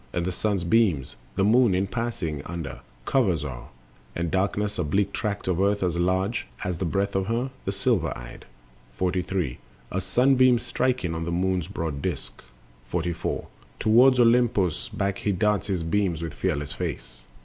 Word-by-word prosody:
And 85 Hz, -1 st, -1 dB
the 95 Hz, -, -1 dB
sun's 100 Hz, 0 st, -1 dB
beams 85 Hz, -, +2 dB, 0.2 s
The -, -, +2 dB
moon, 115 Hz, -1 st, +5 dB
in 95 Hz, +2 st, +1 dB
passing 100 Hz, -, -3 dB
under, 85 Hz, -4 st, -5 dB, 0.3 s
covers 95 Hz, -, +2 dB
o'er, 65 Hz, -4 st, -6 dB, 0.5 s
And 85 Hz, -1 st, -2 dB
darkens 100 Hz, +2 st, 0 dB
a -, -, +2 dB
bleak 100 Hz, +6 st, 0 dB
tract 105 Hz, -3 st, -3 dB
of 90 Hz, 0 st, +1 dB
earth 100 Hz, 0 st, +2 dB
as 90 Hz, -2 st, 0 dB
large 95 Hz, +5 st, 0 dB, 0.2 s
As 90 Hz, -, -1 dB
is 85 Hz, -, -7 dB
the 95 Hz, -, -1 dB
breadth 100 Hz, +4 st, 0 dB
of 95 Hz, 0 st, 0 dB
her, 120 Hz, +4 st, -1 dB
the 95 Hz, -, 0 dB
silver 100 Hz, -6 st, +1 dB
eyed. -, -, -10 dB, 0.5 s
43. 90 Hz, -6 st, -1 dB, 0.3 s
As 95 Hz, 0 st, -2 dB
sunbeam 130 Hz, +2 st, +4 dB
striking 120 Hz, -5 st, -1 dB
on 80 Hz, 0 st, -3 dB
the 85 Hz, -, -2 dB
moon's 90 Hz, -1 st, 0 dB
broad 80 Hz, -4 st, -4 dB
disk. -, -, -4 dB, 0.5 s
44. 85 Hz, -1 st, -2 dB, 0.3 s
Toward 125 Hz, +4 st, +6 dB
Olympos 115 Hz, -8 st, +3 dB
back 100 Hz, 0 st, -2 dB
he 105 Hz, -, 0 dB
darts 105 Hz, +2 st, +1 dB
his 95 Hz, -4 st, -1 dB
beams, 85 Hz, -2 st, 0 dB
With 80 Hz, -3 st, -4 dB
fearless 75 Hz, -6 st, -2 dB
face. -, -, -5 dB
95 Hz, 170 wpm, -26 LUFS, 85-105 Hz, 0.5 s, Toward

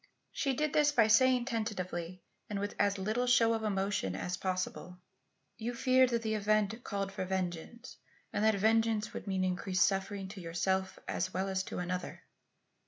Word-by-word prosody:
She 270 Hz, -2 st, -1 dB
did 300 Hz, +1 st, 0 dB
this 295 Hz, -1 st, +4 dB
by 235 Hz, -6 st, +5 dB
saying 250 Hz, +2 st, +5 dB
tentatively 185 Hz, -7 st, -3 dB, 0.3 s
and 205 Hz, -1 st, -2 dB
with 205 Hz, +1 st, -3 dB
as 200 Hz, 0 st, +2 dB
little 215 Hz, +6 st, -1 dB
show 230 Hz, -2 st, +5 dB
of 225 Hz, -, -1 dB
emotion 195 Hz, -, -1 dB
as 180 Hz, -, -3 dB
possible: 185 Hz, -1 st, -3 dB, 0.6 s
"You 235 Hz, +2 st, -3 dB
feared 255 Hz, +1 st, +4 dB
that 235 Hz, -1 st, -1 dB
the 220 Hz, -1 st, -1 dB
event 215 Hz, +2 st, +1 dB
called 195 Hz, -2 st, -3 dB
for 190 Hz, -, -4 dB
vengeance 185 Hz, +4 st, -4 dB, 0.4 s
and 205 Hz, -, 0 dB
that 220 Hz, -1 st, +4 dB
vengeance 220 Hz, +1 st, +2 dB
would -, -, -7 dB
mean 190 Hz, -1 st, 0 dB
increased 185 Hz, 0 st, +1 dB
suffering 195 Hz, 0 st, -2 dB
to 195 Hz, -1 st, -8 dB
yourself 190 Hz, +3 st, -1 dB
as 185 Hz, 0 st, -2 dB
well 190 Hz, +1 st, 0 dB
as 190 Hz, -1 st, 0 dB
to -, -, -6 dB
another?" 180 Hz, +1 st, -4 dB
200 Hz, 170 wpm, -32 LUFS, 185-225 Hz, 0.6 s, by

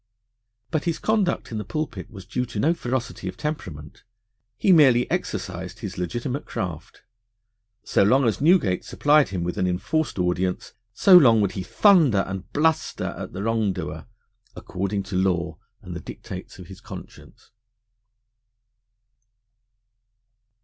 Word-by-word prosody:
But 155 Hz, +1 st, -1 dB
his 170 Hz, -2 st, 0 dB
conduct 210 Hz, -, 0 dB
in 110 Hz, -, -3 dB
the -, -, -4 dB
pulpit 155 Hz, +10 st, -5 dB
was 95 Hz, -4 st, -11 dB
due 125 Hz, -1 st, -2 dB
to 115 Hz, -3 st, -5 dB
no 160 Hz, +9 st, +3 dB
ferocity 125 Hz, -, -4 dB
of 95 Hz, -, -6 dB
temperament. 85 Hz, -, -6 dB, 0.5 s
He 195 Hz, -, +3 dB
merely 130 Hz, -8 st, +6 dB
exercised 95 Hz, -, -4 dB
his 100 Hz, -4 st, -5 dB
legitimate 120 Hz, -, -3 dB
craft. 90 Hz, -9 st, -6 dB, 0.8 s
So -, -, +1 dB
long 130 Hz, +7 st, +4 dB
as 110 Hz, 0 st, 0 dB
Newgate 150 Hz, -, +3 dB
supplied 150 Hz, 0 st, +3 dB
him 90 Hz, -3 st, -3 dB
with 90 Hz, 0 st, -3 dB
an 90 Hz, -, +1 dB
enforced 125 Hz, -, -1 dB
audience, 90 Hz, 0 st, -1 dB, 0.2 s
so 185 Hz, -, +6 dB
long 125 Hz, -10 st, +7 dB
would 100 Hz, -2 st, +1 dB
he 95 Hz, -, -5 dB
thunder 150 Hz, -, +4 dB
and 95 Hz, -1 st, -6 dB
bluster 160 Hz, +1 st, 0 dB
at -, -, -7 dB
the 95 Hz, -, -4 dB
wrongdoer 95 Hz, -9 st, -2 dB, 0.5 s
according 100 Hz, +2 st, -3 dB
to 95 Hz, 0 st, -6 dB
law 90 Hz, -3 st, 0 dB, 0.2 s
and -, -, -7 dB
the -, -, -4 dB
dictates -, -, -9 dB
of -, -, -10 dB
his -, -, -12 dB
conscience. -, -, -12 dB
105 Hz, 140 wpm, -24 LUFS, 90-150 Hz, 0.8 s, long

